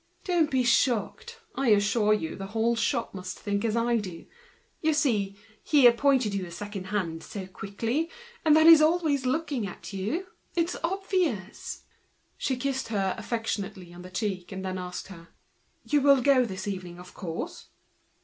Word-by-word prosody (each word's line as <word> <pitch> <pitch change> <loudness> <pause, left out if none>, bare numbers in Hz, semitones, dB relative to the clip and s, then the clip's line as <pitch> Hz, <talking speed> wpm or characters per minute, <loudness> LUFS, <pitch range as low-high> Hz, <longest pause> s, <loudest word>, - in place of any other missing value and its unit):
Don't 345 -4 +2
be 260 -2 +2
shocked; 245 - +1
I 270 -1 -1
assure 210 0 +3
you 185 -7 0
the 195 - -6
whole 230 +1 +2
shop 235 0 -1
must 185 -1 -6
think 200 -1 -2
as 225 -1 0
I 235 0 +2
do. 185 -6 -6 0.6
Naturally! 250 -11 +1 0.3
he 290 -4 +4
appointed 245 -2 +4
you 195 -1 -1
as 170 - -9
second 205 -1 -6
hand 185 -5 -2
so 195 -2 -7
quickly, 225 - -3 0.3
then 315 0 +6
he's 325 -2 +10
always 310 -5 +2
after 250 - -3
you. 225 - -2 0.3
It's 335 0 +1
obvious!" 345 - -2 0.5
She 265 - -1
kissed 265 +1 -2
her 195 -4 0
affectionately, 205 -5 -4
and 175 +1 -10 0.6
then 185 0 -3
asked 180 +1 -6
her: 170 -3 -11 0.6
"You 295 -1 +2
will 275 -2 +5
go 265 -2 +5
this 190 -2 -6
evening, 185 -3 -5
of 180 0 -12
course?" 165 -4 -6
230 Hz, 150 wpm, -27 LUFS, 195-280 Hz, 0.6 s, he's